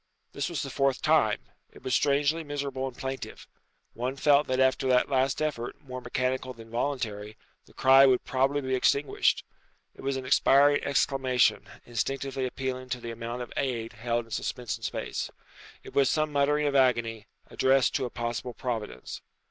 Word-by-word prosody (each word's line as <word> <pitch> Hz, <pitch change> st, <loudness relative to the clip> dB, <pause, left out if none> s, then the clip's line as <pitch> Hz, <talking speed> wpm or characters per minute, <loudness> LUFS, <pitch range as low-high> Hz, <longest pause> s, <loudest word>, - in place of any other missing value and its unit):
This 140 Hz, +4 st, -2 dB
was 170 Hz, -, -3 dB
the 135 Hz, -, -6 dB
fourth 135 Hz, -1 st, 0 dB
time. -, -, +3 dB, 0.3 s
It -, -, -16 dB
was 130 Hz, -, -2 dB
strangely 145 Hz, +3 st, +2 dB
miserable 140 Hz, -3 st, -3 dB
and 130 Hz, -, -9 dB
plaintive. 135 Hz, 0 st, -6 dB, 0.5 s
One 125 Hz, +3 st, -3 dB
felt 145 Hz, +1 st, +4 dB
that 130 Hz, 0 st, 0 dB
after 130 Hz, 0 st, +2 dB
that 125 Hz, +2 st, +3 dB
last 135 Hz, +2 st, +1 dB
effort, 130 Hz, -6 st, -3 dB
more 130 Hz, -3 st, -8 dB
mechanical 130 Hz, +1 st, -2 dB
than 115 Hz, -1 st, -14 dB
voluntary, 110 Hz, -5 st, -3 dB, 0.3 s
the -, -, -21 dB
cry 135 Hz, +1 st, +7 dB
would 130 Hz, -1 st, +3 dB
probably 135 Hz, +2 st, +1 dB
be 130 Hz, -1 st, -2 dB
extinguished. 140 Hz, +2 st, +2 dB, 0.5 s
It -, -, -14 dB
was 135 Hz, 0 st, -1 dB
an 130 Hz, -, -6 dB
expiring 140 Hz, +2 st, +4 dB
exclamation, 130 Hz, -3 st, +2 dB, 0.2 s
instinctively 135 Hz, +2 st, -2 dB
appealing 130 Hz, 0 st, -4 dB
to 125 Hz, -, -2 dB
the 115 Hz, -1 st, -6 dB
amount 115 Hz, +2 st, -5 dB
of 120 Hz, -, -10 dB
aid 115 Hz, -4 st, -2 dB
held 120 Hz, +2 st, -2 dB
in 115 Hz, -, -20 dB
suspense 120 Hz, -1 st, -3 dB
in -, -, -13 dB
space. -, -, -3 dB, 0.5 s
It -, -, -11 dB
was 135 Hz, -2 st, +3 dB
some 155 Hz, +1 st, +1 dB
muttering 145 Hz, +1 st, +2 dB
of 145 Hz, -1 st, 0 dB
agony, 120 Hz, -5 st, +2 dB, 0.2 s
addressed 130 Hz, -1 st, +3 dB
to 130 Hz, -, 0 dB
a -, -, -4 dB
possible 120 Hz, 0 st, -4 dB
Providence. 110 Hz, -, -5 dB
130 Hz, 170 wpm, -28 LUFS, 120-140 Hz, 0.5 s, cry